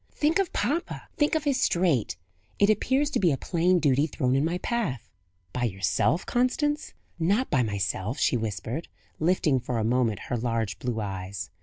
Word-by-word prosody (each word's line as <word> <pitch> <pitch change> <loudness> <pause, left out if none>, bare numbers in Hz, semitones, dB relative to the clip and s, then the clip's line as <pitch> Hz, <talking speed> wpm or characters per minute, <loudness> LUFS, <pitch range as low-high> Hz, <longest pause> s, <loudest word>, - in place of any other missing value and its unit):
"Think 310 +5 +2
of 390 -4 0
papa! 295 - -2
think 295 +1 +2
of 315 - 0
his 275 -4 +1
strait! 170 - +1 0.4
It 205 +1 +5
appears 265 +7 +1
to - - +1
be 175 -4 +3
a 135 - 0
plain 180 +3 +2
duty 145 -2 +3
thrown 130 -3 0
in 135 - +2
my 170 +3 0
path." 200 - -2 0.5
"By 120 - 0
yourself, 105 - +1
Constance?" 295 +5 0 0.2
"Not 200 +10 +1
by 130 - +3
myself," 100 +1 -2
she - - +2
whispered, 110 - -3 0.3
lifting 155 -4 +2
for 125 0 -3
a 110 - 0
moment 115 -2 +1
her 120 - -3
large 115 -2 -2
blue 120 -3 -2
eyes. 95 -2 -5
145 Hz, 175 wpm, -27 LUFS, -, 0.5 s, It